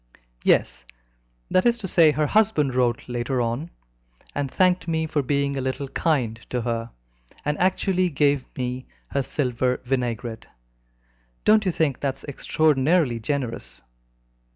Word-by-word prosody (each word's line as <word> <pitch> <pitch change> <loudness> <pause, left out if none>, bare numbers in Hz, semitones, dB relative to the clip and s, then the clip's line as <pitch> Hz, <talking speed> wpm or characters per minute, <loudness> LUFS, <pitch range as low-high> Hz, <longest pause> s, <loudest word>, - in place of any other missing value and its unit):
"Yes - - +2 0.7
that 185 - +4
is 240 0 +3
to 210 -4 -5
say, 165 -3 +5
her 150 0 0
husband 175 - +2
wrote 125 -2 0
later 125 +1 -2
on, 120 +7 -2 0.6
and 145 -1 -2
thanked 180 +4 +2
me 160 -1 0
for 155 -2 0
being 140 +1 0
a 135 - -2
little 130 +2 -3
kind 130 -10 0
to 125 - -1
her, 115 -1 -2 0.6
and 150 0 +1
actually 185 0 +2
gave 145 -2 +2
me 125 0 -3 0.2
her 140 - 0
silver 125 -2 -1
vinaigrette. 120 -3 -2 1.0
Don't 215 0 +5
you - - +3
think 155 -5 0
that 135 -2 -1
is - - -16
extraordinarily 145 -1 +2
generous? 125 0 -4
140 Hz, 140 wpm, -24 LUFS, 125-160 Hz, 1.0 s, say